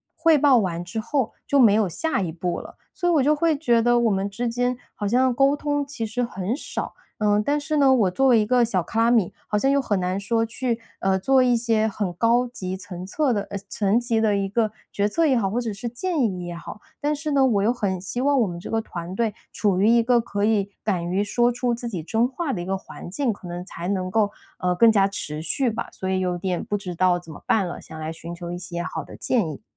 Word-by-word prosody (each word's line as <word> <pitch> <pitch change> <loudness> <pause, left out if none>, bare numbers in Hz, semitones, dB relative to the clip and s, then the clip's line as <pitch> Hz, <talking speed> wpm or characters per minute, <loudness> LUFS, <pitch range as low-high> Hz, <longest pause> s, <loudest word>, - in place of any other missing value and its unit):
汇 325 -1 +4
报 275 -3 +5
完 175 -5 -1
之 205 +6 -5
后 250 +1 -1
就 280 - +3
没 225 -5 +7
有 215 -2 +3
下 255 - -1
一 170 -3 -2
步 175 +1 -3
了。 - - -12 0.2
所 350 -2 0
以 - - +3
我 285 -5 +4
就 300 +2 +4
会 325 0 +2
觉 240 -6 +3
得 240 0 +4
我 230 -3 +2
们 195 +1 0
之 235 +5 -3
间 245 +1 0 0.2
好 205 - -3
像 255 +3 +3
沟 275 +3 +3
通 290 -1 -1
其 265 -5 -4
实 245 +3 -2
很 200 0 -2
少， - - -5 0.2
呃， 210 -1 +2
但 290 +4 +1
是 305 +1 -2
呢， 275 -2 +5
我 215 -8 +3
作 270 +8 +2
为 235 -3 +6
一 210 - +2
个 245 +1 +3
小 190 -7 0
卡 225 - -3
拉 230 - +4
米 225 -7 +2
好 210 - 0
像 270 +6 +2
又 280 0 +3
很 205 -6 0
难 185 +2 -1
说 225 +3 0
去， 235 0 -2 0.2
呃， 190 0 +2
做 265 +7 +3
一 245 -2 +3
些 225 -2 +1
很 200 -4 -3
高 235 +6 +2
级 190 -6 -5
层 180 -2 -8
策 255 +7 0
的 205 - 0
呃， 200 - -4
层 205 +2 +1
级 230 -2 0
的 210 -2 +2
一 195 - 0
个 215 +1 0 0.2
决 205 +1 0
策 330 +8 +1
也 275 -4 +3
好， 200 -5 +1
或 235 +5 -1
者 225 -4 -3
是 230 +4 -5
建 320 +5 -2
议 185 -6 -1
也 175 0 -5
好。 170 +5 -9 0.2
但 295 +1 +1
是 300 +1 -3
呢， 275 -1 +4
我 210 -6 +3
又 235 +3 +3
很 195 -6 -2
希 195 +7 -3
望 280 -1 +3
我 230 - +4
们 175 -2 -5
这 - - -8
个 225 - +1
团 175 -3 -6
队 225 -2 0 0.2
处 195 -4 +1
于 210 - +4
一 235 0 +5
个 240 0 +3
可 205 -2 -2
以 205 -3 +1
敢 190 -5 0
于 195 +3 +1
说 240 +4 +2
出 245 0 -1
自 235 0 -4
己 180 -7 -4
真 225 +8 +1
话 275 +2 -3
的 175 - -3
一 - - -5
个 195 +1 -1
环 180 - -10
境， 235 +3 0
可 190 - -11
能 175 +1 -6
才 175 -2 -6
能 185 -2 -1
够， 210 -1 +2 0.3
呃， 180 0 +1
更 225 +5 +6
加 195 -2 +4
持 155 -6 -4
续 235 - +1
吧， 220 - -4
所 190 - -6
以 190 0 +1
有 180 -1 -1
点 180 0 -2
不 205 - -2
知 180 -3 -6
道 180 0 +3
怎 165 -3 -10
么 - - -13
办 195 -5 +2
了， 175 - -7
想 160 - -10
来 160 +1 -4
寻 170 +1 -8
求 175 0 -7
一 175 - -4
些 175 -1 -4
好 - - -4
的 - - -12
建 220 -11 +1
议。 155 - -8
220 Hz, 290 characters per minute, -24 LUFS, 185-245 Hz, 0.3 s, 没